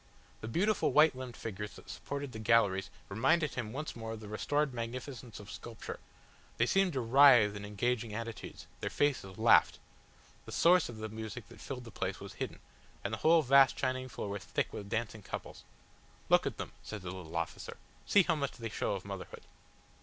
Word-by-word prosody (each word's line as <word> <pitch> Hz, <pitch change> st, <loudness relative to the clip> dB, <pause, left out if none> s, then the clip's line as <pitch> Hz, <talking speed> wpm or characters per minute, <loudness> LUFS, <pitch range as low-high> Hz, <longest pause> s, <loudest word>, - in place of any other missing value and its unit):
The 110 Hz, -, -6 dB
beautiful 195 Hz, -, +2 dB
white 155 Hz, -2 st, +6 dB
limbed 130 Hz, -2 st, -7 dB
figures 105 Hz, -1 st, -5 dB
that -, -, -14 dB
supported 140 Hz, -1 st, -5 dB
the 110 Hz, -, -7 dB
galleries 105 Hz, -4 st, +3 dB, 0.2 s
reminded 135 Hz, +9 st, +2 dB
him 110 Hz, -4 st, -4 dB
once 150 Hz, +5 st, -5 dB
more 115 Hz, -1 st, -5 dB
of 110 Hz, -, -7 dB
the 105 Hz, -, -9 dB
restored 145 Hz, +7 st, 0 dB
magnificence 125 Hz, 0 st, -6 dB
of 105 Hz, 0 st, -10 dB
sculpture; 115 Hz, -2 st, -7 dB, 0.6 s
they 115 Hz, -, +4 dB
seemed 195 Hz, +5 st, +2 dB
to 130 Hz, -, 0 dB
writhe 120 Hz, -4 st, +7 dB
in 100 Hz, 0 st, -6 dB
engaging 115 Hz, +2 st, -1 dB
attitudes, 115 Hz, +1 st, -6 dB
their -, -, -2 dB
faces 130 Hz, -10 st, 0 dB
laughed. 115 Hz, +1 st, +5 dB, 0.7 s
The -, -, -7 dB
source 175 Hz, -2 st, +4 dB
of 120 Hz, -, -8 dB
the 110 Hz, 0 st, -4 dB
music 110 Hz, +1 st, -7 dB
that -, -, -13 dB
filled 130 Hz, -3 st, -6 dB
the 115 Hz, -, -10 dB
place -, -, -3 dB
was -, -, -9 dB
hidden, -, -, -5 dB, 0.5 s
and -, -, -3 dB
the -, -, -2 dB
whole 160 Hz, 0 st, +5 dB
vast 135 Hz, 0 st, +6 dB
shining 130 Hz, 0 st, -1 dB
floor 105 Hz, -, -5 dB
was 100 Hz, -1 st, -4 dB
thick -, -, -2 dB
with 100 Hz, -1 st, -6 dB
dancing 115 Hz, -1 st, -2 dB
couples. -, -, -7 dB, 0.7 s
"Look -, -, +5 dB
at -, -, -4 dB
them," -, -, -5 dB
said 105 Hz, -3 st, -7 dB
the 90 Hz, -, -4 dB
little 85 Hz, -3 st, -8 dB
officer, 85 Hz, -, -4 dB, 0.3 s
"see 200 Hz, -, +6 dB
how 170 Hz, -, +2 dB
much 140 Hz, -3 st, -2 dB
they 115 Hz, -2 st, -6 dB
show -, -, -1 dB
of 95 Hz, -, -7 dB
motherhood." 100 Hz, -2 st, -7 dB
115 Hz, 195 wpm, -33 LUFS, 105-140 Hz, 0.7 s, writhe